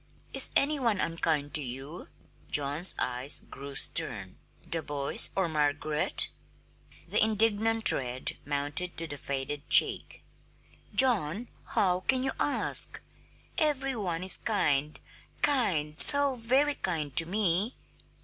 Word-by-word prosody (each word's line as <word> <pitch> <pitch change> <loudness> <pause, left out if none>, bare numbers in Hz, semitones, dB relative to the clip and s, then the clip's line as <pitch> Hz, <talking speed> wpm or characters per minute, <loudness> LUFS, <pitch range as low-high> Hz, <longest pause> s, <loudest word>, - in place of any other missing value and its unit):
"Is - - +5
any 295 +1 +1
one 230 -6 -1
unkind 160 -3 -3
to 150 - +6
you?" 135 +6 -9 0.4
John's 145 +5 0
eyes 125 +3 +2
grew 140 0 -12
stern. 100 -8 +1 0.3
"The 165 - -4
boys, 145 -2 +1
or 190 -2 -1
Margaret?" 150 0 +1 0.8
The - - +2
indignant 220 +1 +1
red 125 0 -4
mounted 145 +5 -1
to 165 - -5
the 145 -3 -10
faded 140 +2 -6
cheek. - - +2 0.7
"John! 230 - +1 0.3
How 180 -2 +1
can 260 +6 -1
you 265 - -2
ask? 290 - +1 0.6
Every 270 -4 -1
one 180 -6 -4
is 185 - +3
kind, 150 -9 -2 0.4
kind, 170 - -1
so 285 -1 +8
very 260 +5 0
kind 155 - -5
to 165 - +6
me!" 200 +3 -1
165 Hz, 120 wpm, -27 LUFS, 145-225 Hz, 0.8 s, so